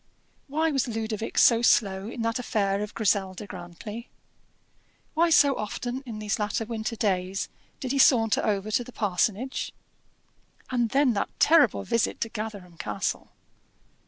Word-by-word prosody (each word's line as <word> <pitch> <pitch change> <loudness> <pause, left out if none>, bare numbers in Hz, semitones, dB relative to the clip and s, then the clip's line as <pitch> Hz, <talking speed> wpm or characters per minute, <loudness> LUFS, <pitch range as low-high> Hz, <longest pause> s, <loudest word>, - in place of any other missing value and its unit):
Why 315 +3 +1
was 270 -4 0
Ludovic 220 -1 -4
so 230 -1 +6
slow 200 -3 +2
in 235 -1 -5
that 230 +1 0
affair 200 -4 0
of 210 0 -5
Griselda 200 -2 0
Grantly? 200 +5 -8 1.0
why 335 +2 +3
so 285 -4 +5
often 245 +4 -4
in 225 -3 -6
these 210 -1 -2
latter 210 +2 -1
winter 225 0 -3
days 190 -3 -1 0.3
did 255 -3 -3
he 275 - 0
saunter 225 -5 +4
over 210 -1 -1
to 245 - +1
the 250 - -12
parsonage? 215 +4 -1 1.0
And 240 -2 +1
then 270 0 +3
that 200 - -1
terrible 325 -1 +5
visit 230 -2 0
to 230 - -1
Gatherum 205 -6 -7
Castle! - - -3
220 Hz, 145 wpm, -26 LUFS, 205-245 Hz, 1.0 s, so